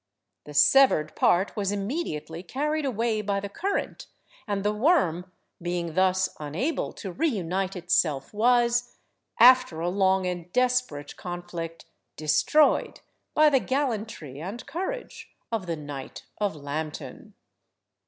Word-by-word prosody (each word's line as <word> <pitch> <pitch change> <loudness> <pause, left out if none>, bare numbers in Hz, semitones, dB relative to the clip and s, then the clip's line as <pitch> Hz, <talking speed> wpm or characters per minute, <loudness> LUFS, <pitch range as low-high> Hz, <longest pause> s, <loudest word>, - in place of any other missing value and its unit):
The 150 - -10
severed 155 - +5
part 185 +3 +2
was 200 -2 -1
immediately 195 - -3
carried 295 - -2
away 230 -3 0
by 200 -1 -1
the 200 0 -6
current, 385 - -3 0.4
and 200 -2 -1
the 210 +1 +1
worm, 200 - +2 0.3
being 175 -1 -3
thus 190 +1 +3
unable 165 - -2
to 195 - -7
reunite 195 - -1
itself, 165 -5 0
was, 240 +2 +2 0.4
after 250 -8 +6
a 170 +2 0
long 190 0 +2
and 180 -1 -4
desperate 250 - 0
conflict, 175 -2 -6 0.3
destroyed 155 - +2 0.3
by 305 0 +6
the 270 - +4
gallantry 225 - -3
and 200 +8 -6
courage 475 +9 -5 0.2
of 215 -5 -2
the 165 - -1
knight 145 -3 -8
of 205 -5 0
Lambton. 150 +1 -6
195 Hz, 125 wpm, -26 LUFS, 165-245 Hz, 0.4 s, after